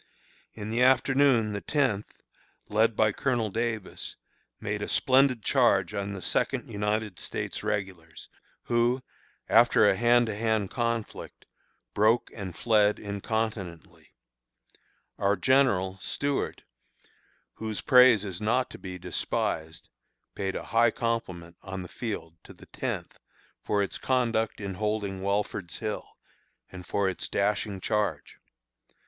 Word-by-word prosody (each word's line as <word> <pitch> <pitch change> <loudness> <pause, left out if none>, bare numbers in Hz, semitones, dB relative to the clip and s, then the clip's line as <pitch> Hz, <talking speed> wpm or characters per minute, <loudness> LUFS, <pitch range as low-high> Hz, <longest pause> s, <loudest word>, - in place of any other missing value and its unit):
In 105 0 -6
the 120 +2 0
afternoon 130 -3 +4
the 100 - -3
Tenth, 130 -9 -1 0.4
led 110 +1 +2
by 110 0 +3
Colonel 120 -2 -1
Davis, 110 -2 -3 0.4
made - - -3
a - - -3
splendid 130 -3 +3
charge - - +3
on 100 0 -3
the 95 - -7
Second - - -1
United 105 -1 -2
States - - -4
Regulars, 90 -5 -4 0.4
who, 120 +2 +1 0.4
after - - +5
a - - +4
hand 120 +2 +4
to 110 -2 -3
hand 110 -2 0
conflict, 115 -2 -3 0.5
broke 110 +3 +2
and 95 -5 -7
fled 105 -1 +3
incontinently. 100 -3 -4 1.1
Our 100 +1 +2
General 95 -5 +2
(Stuart), 140 +6 -2 0.9
whose 110 -1 -5
praise 125 -5 +6
is 95 -2 -5
not 125 +4 +1
to - - -10
be 90 -1 -7
despised, 80 -2 -3 0.5
paid 95 -1 -3
a - - -4
high 115 +1 +4
compliment 95 -8 -3
on 95 -1 -6
the - - -8
field 85 -7 -6
to - - -12
the - - -16
Tenth - - -5 0.4
for 100 -1 +1
its 100 - -4
conduct 115 -4 0
in 100 -2 -4
holding 105 -1 -2
Welford's 100 -2 -2
Hill, 110 -2 -4 0.6
and 90 -1 -10
for 100 -1 +1
its 95 - -3
dashing 100 0 0
charge. 105 -9 -2
105 Hz, 130 wpm, -28 LUFS, 95-115 Hz, 1.1 s, praise